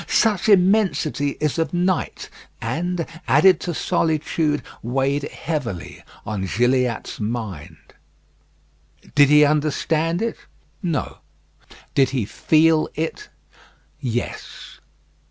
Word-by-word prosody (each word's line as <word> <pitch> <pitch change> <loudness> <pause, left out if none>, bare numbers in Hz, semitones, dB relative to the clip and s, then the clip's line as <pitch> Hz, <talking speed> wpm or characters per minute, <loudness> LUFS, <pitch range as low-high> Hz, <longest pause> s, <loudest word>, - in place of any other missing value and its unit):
Such 220 -2 +2
immensity 185 -7 +2
is 150 +1 -1
of 160 +1 -1
night, 180 +1 -1 0.3
and, 165 +9 -2 0.2
added 155 +8 +5
to 175 - -3
solitude, 155 -3 0 0.2
weighed 135 +4 -1
heavily 130 - -5 0.2
on 100 -2 -3
Gilliatt's 125 +2 0
mind. 105 -8 -5 1.4
Did 145 -1 +6
he 150 0 +7
understand 155 +4 0
it? 230 - -2 0.4
No. 170 -7 -2 0.7
Did 135 -1 +3
he 130 -6 -1
feel 160 +7 +3
it? 165 - -4 0.7
Yes. 120 -4 -5
150 Hz, 95 wpm, -22 LUFS, 130-170 Hz, 1.4 s, he